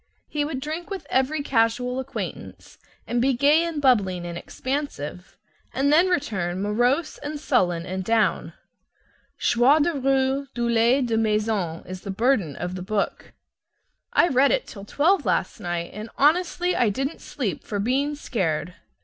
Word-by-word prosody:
He 295 -1 -1
would 290 -3 -3
drink 315 +6 -5
with 390 -2 -5
every 280 +3 +1
casual 250 0 +1
acquaintance, 265 - -7 0.3
and 240 0 0
be 265 +2 +3
gay 290 +6 +4
and 335 -3 -3
bubbling 200 -10 +2
and 170 0 -5
expansive; 185 - -5 0.4
and 280 +2 +2
then 340 +4 +5
return 200 - -1
morose 245 - 0
and 295 +1 -5
sullen 180 - +1
and 185 +1 -4
down. 225 +2 +1 0.8
"Joie 245 +5 +4
de 315 +3 +2
rue, 270 0 +1
douleur 235 +2 +3
de 230 -2 0
maison," 210 -6 0
is 185 0 -7
the - - -8
burden 200 - +1
of 175 +1 -4
the 185 - -5
book. 205 +2 -3 0.8
I 345 - +4
read 275 -2 +4
it - - +1
till 200 -2 -10
twelve 330 - +2
last - - -1
night, 175 -3 -3
and 215 +2 -7
honestly 355 +4 +2
I 235 - +3
didn't 270 +9 -3
sleep 210 - -4
for 205 - -4
being 270 +8 0
scared. 175 - -2
245 Hz, 155 wpm, -24 LUFS, 200-285 Hz, 0.8 s, then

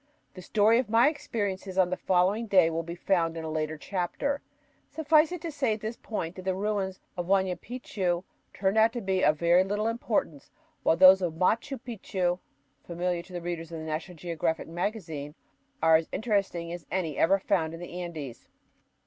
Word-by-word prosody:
The 185 - -10
story 215 +5 +3
of 250 - -2
my 230 +5 +5
experiences 205 - -4
on 185 -1 +3
the - - +1
following 190 +6 +1
day 185 -5 +5
will 165 +1 -1
be 170 +1 -7
found 170 -2 0
in 165 - -5
a 160 - -4
later 155 0 -2
chapter. 200 - -2 0.5
Suffice 310 0 +3
it 360 -3 -5
to 330 - -4
say 265 -7 0
at 215 - -12
this 220 +2 -4
point 185 -8 -4
that 185 - -7
the 185 0 -1
ruins 195 -1 -2 0.2
of 175 -1 -4
Huayna 190 -1 +2
Picchu 190 -8 -2 0.3
turned 195 +2 +1
out 225 +1 +5
to 240 - -3
be 190 -2 0
of 150 +1 +4
very 170 +3 +4
little 205 +2 -2
importance, 225 - -2 0.3
while 165 - +3
those 190 +1 +8
of 175 -3 -1
Machu 225 - 0
Picchu, 190 -7 -2 0.4
familiar 175 0 -2
to 175 0 -7
readers 170 -1 -5
of 165 - -5
the 160 - -6
"National 160 +3 -4
Geographic 165 -1 -2
Magazine," 165 -5 -4 0.5
are 160 0 +7
as 160 - -5
interesting 195 -6 -1
as 175 -3 -8
any 170 -6 -2
ever 190 +8 +4
found 175 -5 0
in - - -10
the 175 +1 -6
Andes. 155 -8 -7
185 Hz, 190 wpm, -28 LUFS, 170-215 Hz, 0.5 s, those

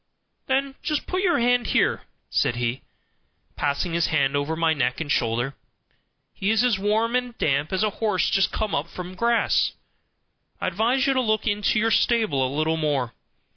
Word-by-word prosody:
"Then 270 +1 0
just 300 -2 -2
put 370 0 -2
your 360 -3 +2
hand 245 -1 +2
here," - - +1 0.3
said 120 - +1
he, 120 +2 -2 0.7
passing 145 +4 -1
his 170 0 +1
hand 140 -2 +1
over 145 +3 -1
my 165 0 +2
neck 125 -4 -1
and 155 -3 -3
shoulder; 120 +3 0 0.8
"he 195 - -2
is 220 +2 +3
as 235 -6 +2
warm 220 +4 +1
and 250 -1 -2
damp 145 +1 0
as 190 +2 0
a 215 - +1
horse 210 -5 +1
just 195 -3 +2
come 215 -1 -2
up 145 +4 -1
from 180 +1 -8
grass. 235 +4 +1 0.9
I - - -3
advise 230 +8 +1
you 275 - +3
to 260 - +2
look 215 -3 0
into 210 -1 +1
your 225 +1 +2
stable 220 - +2
a 130 - 0
little 155 +3 0
more. 145 -6 -1
190 Hz, 180 wpm, -24 LUFS, 145-235 Hz, 0.9 s, is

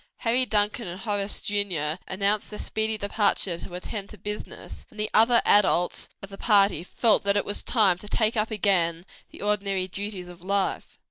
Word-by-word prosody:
Harry 250 +2 +2
Duncan 210 +1 0
and 180 +2 -7
Horace 205 -2 -2
Jr. 180 -6 -2
announced 200 +2 0
their 210 - -7
speedy 220 +1 -2
departure 200 -4 +1
to 175 - -9
attend 200 +2 -5
to 215 - -12
business, 210 0 -7
and 215 - -15
the 215 - -2
other 230 +2 +5
adults 185 -3 +3
of 195 - -7
the 195 - -10
party 200 -6 +4
felt 220 +4 +2
that 200 0 +1
it 205 - 0
was 205 - -3
time 195 -7 +2
to 210 - -9
take 220 +2 +1
up 215 0 0
again 180 -5 +1 0.2
the - - -11
ordinary 200 -2 0
duties 195 -1 -5
of 175 0 -13
life. 195 +1 -2
205 Hz, 185 wpm, -25 LUFS, 185-215 Hz, 0.2 s, other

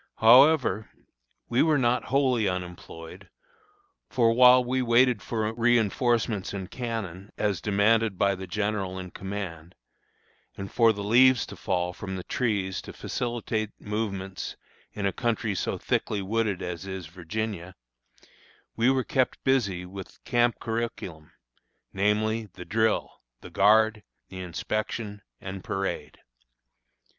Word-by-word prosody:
However, 125 -2 +5 0.6
we 120 - +2
were 155 -2 +4
not 125 -1 +1
wholly 130 -5 +2
unemployed; 90 -3 -6 0.8
for 115 -3 +3
while 125 +1 +7
we 130 +1 0
waited 120 -1 +4
for 110 -1 -2
reinforcements 115 -3 +1
and 95 -2 -6
cannon, 105 -6 -5
as 100 -6 0
demanded 105 +1 +2
by 100 +1 +3
the 95 0 -7
general 100 -1 -2
in 90 -1 -7
command, 95 -4 -6 0.8
and 95 0 -6
for 115 -1 +5
the 100 -2 -5
leaves 125 +4 +5
to - - -10
fall 90 -3 -1
from 95 +1 -6
the 90 - -5
trees 100 -6 -1
to - - -10
facilitate 115 -3 -3
movements 100 -3 -4 0.3
in 100 - -4
a 100 - +1
country 115 -3 -1
so 95 - -2
thickly 105 - -1
wooded 105 -1 -1
as 90 +2 -5
is 95 -2 -5
Virginia, 90 +2 -5 1.0
we 115 +3 +3
were 130 -1 +2
kept 130 0 0
busy 100 -10 +1
with 95 +1 -9
the - - -25
camp 120 -1 +2
curriculum, 110 -9 -4 0.6
namely, 110 +3 +1
the 90 - -9
drill, 110 +1 0 0.2
the - - -11
guard, 110 +2 +4 0.3
the 95 - -8
inspection, 105 +4 -4 0.2
and 95 -1 -7
parade. 95 0 -3
105 Hz, 130 wpm, -27 LUFS, 95-115 Hz, 1.0 s, while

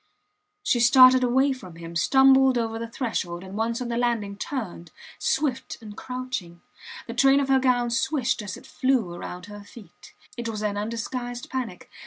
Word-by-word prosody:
She 255 -12 +2
started 255 +1 +7
away 265 +3 +3
from 185 -10 -11
him, 170 0 -9
stumbled 265 - +5
over 225 -1 -2
the 230 - -4
threshold, 190 -8 -3
and 190 +1 -9
once 230 +2 -1
on 240 - -5
the 235 - -2
landing 230 -5 -1
turned, 200 - -5 0.3
swift 265 -3 -1
and 215 -3 -10
crouching. 250 -10 -6 0.4
The - - -6
train 275 0 +4
of 275 -1 -1
her 265 0 +5
gown 245 -2 +1
swished 250 0 0
as 200 -3 -6
it - - -15
flew 255 -10 0
round 180 +1 -7
her 205 0 -10
feet. 210 +1 -15 0.2
It 235 -1 -4
was 215 -1 -4
an 205 -1 -1
undisguised 240 +3 -4
panic. 245 -9 -5
235 Hz, 175 wpm, -25 LUFS, 205-260 Hz, 0.4 s, started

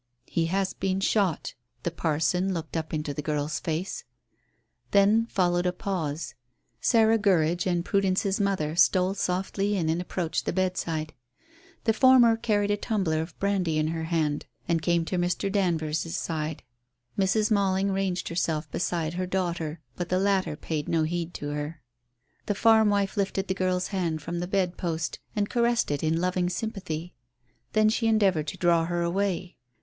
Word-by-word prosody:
"He 165 -1 0
has 190 +2 0
been 190 0 -1
shot." 195 -4 +1 0.3
The 170 - -1
parson 165 +4 0
looked 165 -1 -5
up 160 -1 -2
into 150 -2 -2
the 150 - -4
girl's 150 0 -2
face. 175 - -3 0.9
Then 210 +3 +4
followed 175 -3 +1
a - - +2
pause. 170 -5 -3 0.5
Sarah 225 -1 +4
Gurridge 175 -3 +2
and 175 -1 0
Prudence's 195 0 +1
mother 190 -6 0
stole 185 +1 +4
softly 195 +1 -1
in 165 -3 0
and 165 +2 0
approached 175 -3 -2
the - - 0
bedside. 170 -4 -1 0.7
The 225 - +3
former 245 -1 +6
carried 205 -2 +1
a 205 - +1
tumbler 190 -8 0
of 160 0 -8
brandy 190 -5 0
in 155 0 +1
her 165 0 -3
hand 155 -3 -1 0.2
and 165 -1 +1
came 170 0 +1
to 180 +1 -1
Mr. 180 +2 0
Danvers's 165 -4 0
side; 155 -2 -3 0.5
Mrs. 210 +3 +2
Malling 195 -1 +2
ranged 190 -2 -1
herself 160 -3 -1
beside 170 -2 -1
her 180 +1 -2
daughter, 170 -4 -2
but 175 - -4
the 185 - +2
latter 195 -4 +1
paid 150 -1 -4
no 165 -1 +2
heed 170 +1 -2
to 145 - -4
her. 150 0 -5 0.6
The 205 - 0
farm 220 0 +5
wife 200 0 0
lifted 195 -1 -1
the 190 - 0
girl's 185 -1 0
hand 170 -6 -2
from 170 +2 -3
the 175 - -3
bedpost 175 -4 -1 0.2
and 205 -1 +1
caressed 235 -5 +1
it 145 - -1
in 160 +1 +1
loving 180 0 0
sympathy. 180 -6 -4 0.6
Then 215 0 +4
she 225 +1 +1
endeavoured 195 -8 +3
to - - -5
draw 170 -2 +3
her 175 0 -1
away. 185 0 -1
180 Hz, 165 wpm, -27 LUFS, 160-195 Hz, 0.9 s, former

